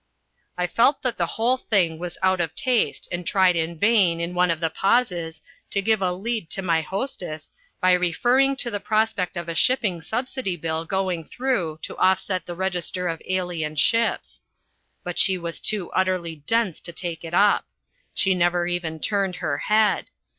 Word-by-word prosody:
I 180 - +1
felt 235 +9 +2
that 250 -3 -1
the - - +1
whole 240 +3 +2
thing 175 -9 +1
was 175 0 -6
out 185 -1 +3
of 165 -2 -3
taste 255 -4 0
and 175 0 -3
tried 185 0 +3
in 165 0 -2
vain, 195 -4 +3
in 170 +1 -3
one 180 0 +2
of 165 -1 0
the 165 -1 -1
pauses, 175 -8 0 0.3
to 200 - 0
give 215 +1 +1
a 185 -1 +1
lead 200 -1 -3
to 195 - -2
my 165 -3 +2
hostess 175 - -5 0.3
by 185 - +4
referring 245 +10 +2
to 240 -2 -2
the 205 - -2
prospect 215 -4 0
of 170 0 -4
a 165 - -3
shipping 195 -2 +2
subsidy 245 +1 -3
bill 160 0 -3
going 185 -2 -1
through 185 - -2
to - - -6
offset 185 -1 +1
the 175 - -5
register 180 0 -2
of 165 -1 -3
alien 175 -4 -2
ships. 230 +9 +1 0.6
But 180 -2 -3
she 190 -1 +5
was 170 -1 -4
too 205 -5 -2
utterly 185 -3 0
dense 225 -7 +1
to 170 - -7
take 170 -1 -5
it 165 +1 -4
up. 205 +2 +4 0.5
She 190 - +3
never 175 -1 +1
even 175 -2 -3
turned 195 -3 0
her - - -2
head. 215 0 +2
180 Hz, 180 wpm, -24 LUFS, 170-210 Hz, 0.6 s, she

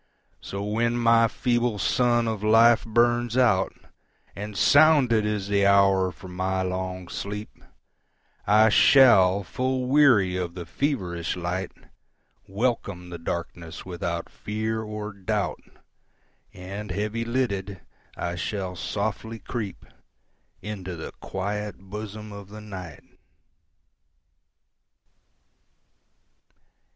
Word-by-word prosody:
So 100 +1 -6
when 115 +3 0
my 115 -1 +4
feeble 120 -1 0
sun 120 +3 +2
of 110 -2 -2
life 115 +2 +5
burns 120 +1 +2
out, 105 -7 +3 0.6
And 105 +1 -6
sounded 140 -8 +5
is 105 -2 -2
the 100 -1 +3
hour 95 -2 +4
for 95 - -12
my 95 +1 -2
long 90 0 -4
sleep,I 105 +1 -2
shall, 100 -7 +6
full 130 +8 -2
weary 125 -9 +4
of 90 -1 -3
the 90 -2 -6
feverish 90 - -2
light, 90 +1 -3 0.8
Welcome 100 -4 -2
the 85 - -7
darkness 85 0 -6
without 85 -2 -4
fear 110 +1 -3
or 105 -1 -6
doubt, 100 0 -2 0.9
And 100 +1 -7
heavy 105 +3 -2
lidded, 100 -6 -2 0.4
I 85 - -3
shall 95 0 -3
softly 110 +4 -3
creepInto 100 -3 -9
the 80 - -7
quiet 105 +2 -4
bosom 105 +2 -8
of 100 -1 -10
the 105 +1 -9
Night. 95 -7 -9
105 Hz, 100 wpm, -25 LUFS, 95-115 Hz, 0.9 s, shall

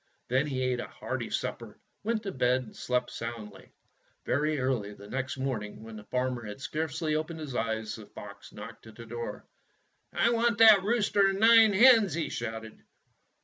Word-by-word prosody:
Then 130 +4 +2
he 130 -3 -2
ate 125 -1 0
a - - -5
hearty - - -5
supper, - - -4 0.3
went 225 0 -1
to 195 - -4
bed, 130 -2 +1
and 110 - -14
slept 125 -1 -1
soundly. 110 -4 -8 0.5
Very 150 +2 0
early 125 -6 -1
the 100 - -13
next 130 +3 -4
morning, 120 -6 -4
when 110 0 -10
the 105 -1 -10
farmer 125 -1 -2
had 105 +3 -8
scarcely 155 +3 -2
opened 155 +1 -3
his 145 -5 -6
eyes, 110 -2 -2
the 105 -2 -11
fox 100 -1 -11
knocked 115 +2 -11
at 110 - -13
the 115 - -10
door. 120 +1 -6 0.7
'T 235 - +3
want 235 -1 +2
that 220 -3 +8
rooster 205 -1 +2
and 195 0 -1
the 220 - +4
nine 225 -2 +7
hens!" 220 - +6
he 165 -2 -2
shouted. 110 -1 -6
130 Hz, 185 wpm, -29 LUFS, 115-190 Hz, 0.7 s, that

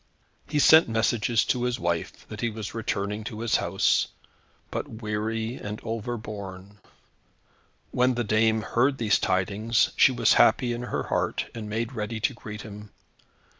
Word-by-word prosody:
He 150 - -1
sent 160 0 +7
messages 115 0 +1
to 125 - 0
his 125 -1 -1
wife, 85 -1 -3
that 105 - -8
he 120 - +1
was 110 -2 -6
returning 105 -1 -2
to 110 0 -6
his 115 -1 +2
house, - - +2 0.6
but - - -3 0.2
weary 110 +2 -2
and 105 +1 -6
overborne. 105 -4 -6 1.1
When 125 0 +2
the 120 - 0
dame 110 0 +2
heard 130 +5 +1
these 110 -4 +2
tidings, 100 +5 +1
she - - +6
was 120 -3 +3
happy 120 -2 +4
in 120 - -4
her 125 - -3
heart, - - -2
and 110 -2 -6
made 115 +3 -2
ready 110 -1 -4
to 110 +5 0
greet 105 -2 -8
him. 105 -2 -10
110 Hz, 155 wpm, -26 LUFS, 105-120 Hz, 1.1 s, sent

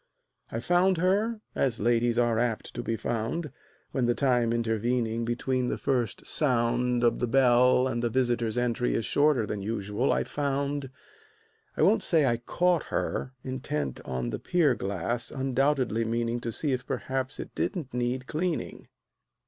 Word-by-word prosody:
I 115 - -2
found 180 +6 +3
her 205 +6 +1
as 125 -4 0
ladies 120 +1 +2
are 120 -2 +2
apt 120 -2 -1
to 120 - -4
be 115 -1 -2
found, 120 +8 -2 0.4
When 125 -3 0
the 120 - +2
time 125 -4 +2
intervening 115 0 0
between 125 +2 -1
the - - -1
first 125 -5 -1
sound 125 -3 +1
Of 120 -1 +3
the 125 - 0
bell 125 0 +4
and 120 -2 -2
the 120 - +1
visitor's 120 -2 0
entry 125 0 0
is 115 - -1
shorter 145 -6 +3
Than 105 -1 -4
usual 105 +3 -1
I - - +1
found; 140 -1 -2 0.9
I - - +3
won't 210 +2 +4
say 165 -5 +3
I 120 -2 +2
caught 175 +7 +1
her, 130 - -2
Intent 75 - -3
on 65 -2 -3
the - - -3
pier 165 -7 +2
glass, 100 +3 -3
undoubtedly 130 -3 +1
meaning 115 +1 -1
To 115 -1 -4
see 145 +5 -1
if 130 0 -2
perhaps 130 +1 -3
it - - -7
didn't 160 - -3
need 125 +1 -1
cleaning. 165 +3 -3
125 Hz, 160 wpm, -28 LUFS, 115-135 Hz, 0.9 s, bell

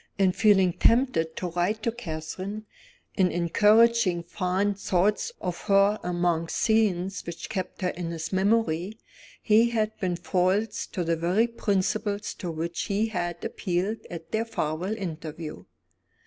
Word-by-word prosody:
In 190 -1 +4
feeling 190 -3 +4
tempted 230 -11 +2
to 180 - -3
write 185 +6 -1
to 230 - +1
Catherine 195 +1 -6 0.5
in 185 -2 +3
encouraging 210 +1 +4
fond 190 +3 -1
thoughts 200 - +1
of 175 -1 -4
her 200 +1 +4
among 175 -2 0
scenes 195 -3 +1
which 170 0 -7
kept 190 -4 -4
her 180 - +2
in 175 -2 -4
his 165 +2 -5
memory 195 -1 +1 0.5
he 225 +2 +5
had 220 -2 -1
been 180 -2 0
false 190 +5 0
to 180 - -3
the 165 0 +1
very 175 +7 +2
principles 205 -2 -1
to 180 - -6
which 165 +1 -3
he 210 +3 0
had 175 -4 -3
appealed 190 +4 -2
at 165 -1 -8
their 220 +1 +1
farewell 180 0 -2
interview. 160 -4 -6
190 Hz, 140 wpm, -26 LUFS, 175-215 Hz, 0.5 s, he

